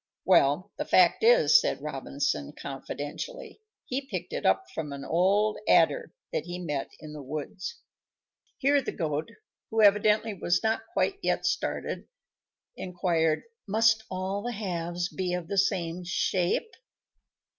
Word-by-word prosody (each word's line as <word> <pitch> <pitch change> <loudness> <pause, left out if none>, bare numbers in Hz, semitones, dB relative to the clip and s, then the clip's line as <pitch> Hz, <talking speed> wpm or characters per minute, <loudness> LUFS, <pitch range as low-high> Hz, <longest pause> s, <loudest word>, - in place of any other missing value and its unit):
"Well, 145 +6 +4
the - - -1
fact 180 -2 +4
is," 470 0 +7
said - - -1
Robinson, 140 - -3
confidentially, 145 - -6 0.2
"he 260 +2 -2
picked - - -5
it - - 0
up 385 - +3
from 155 -3 -4
an 140 0 -7
old 200 +5 +2
Adder, - - +4 0.2
that - - -1
he 175 0 -5
met 150 -6 -3
in 155 -1 -9
the 150 - -7
woods." 155 - -6 0.8
Here 280 +1 +3
the - - -4
Goat, 155 -3 -2 0.4
who 220 -1 +2
evidently 210 +1 +4
was 175 0 0
not 220 0 +1
yet 225 - -26 0.3
quite - - 0
started, - - -2 0.7
inquired, 175 -3 0 0.2
"Must 220 +2 +3
all 190 +2 -2
the 245 +3 -3
halves 175 -4 -2
be 180 -1 -2
of 175 -2 -5
the 200 - -3
same 180 -3 0
shape?" 180 - 0
180 Hz, 140 wpm, -28 LUFS, 160-215 Hz, 0.8 s, is